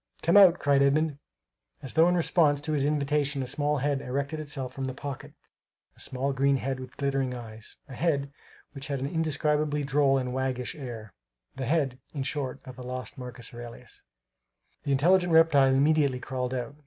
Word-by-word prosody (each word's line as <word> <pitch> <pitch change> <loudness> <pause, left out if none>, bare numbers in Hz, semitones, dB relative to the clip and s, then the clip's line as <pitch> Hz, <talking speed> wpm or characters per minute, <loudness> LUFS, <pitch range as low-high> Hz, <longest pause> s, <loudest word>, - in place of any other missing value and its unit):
"Come 170 - +3
out!" 190 -4 +8
cried 140 -1 +3
Edmund. 145 +1 +2 0.6
As 135 - -6
though 165 +2 +5
in 180 - +2
response 155 -4 +3
to 155 - -4
his 140 -2 +1
invitation 145 -1 0
a - - -4
small 145 +3 -1
head 140 0 0
erected 140 +4 -3
itself 135 -4 -5
from 135 - -4
the 130 -1 -4
pocket, 145 +1 -7 0.6
a - - -22
small 135 +2 -2
green 140 +1 +2
head 135 0 -3
with 130 - -10
glittering 135 -2 -1
eyes, 110 -2 -9
a 135 - -10
head 140 -1 -1 0.4
which 135 -1 -6
had 140 -2 -2
an 135 - -3
indescribably 150 -1 0
droll 140 -1 +3
and 125 -1 -2
Waggish 130 -1 -2
air 120 -7 -8 0.4
the 130 -2 -4
head, 140 -5 0 0.2
in 140 - -2
short, 135 -1 -4
of 130 -1 -10
the 125 - -8
lost 125 0 -6
Marcus 125 -1 -9
Aurelius. 120 0 -10 0.8
The 140 - 0
intelligent 175 +6 +3
reptile 155 -5 +6
immediately 140 -1 +3
crawled 130 0 -3
out. 125 +3 -5
140 Hz, 180 wpm, -28 LUFS, 130-150 Hz, 0.8 s, out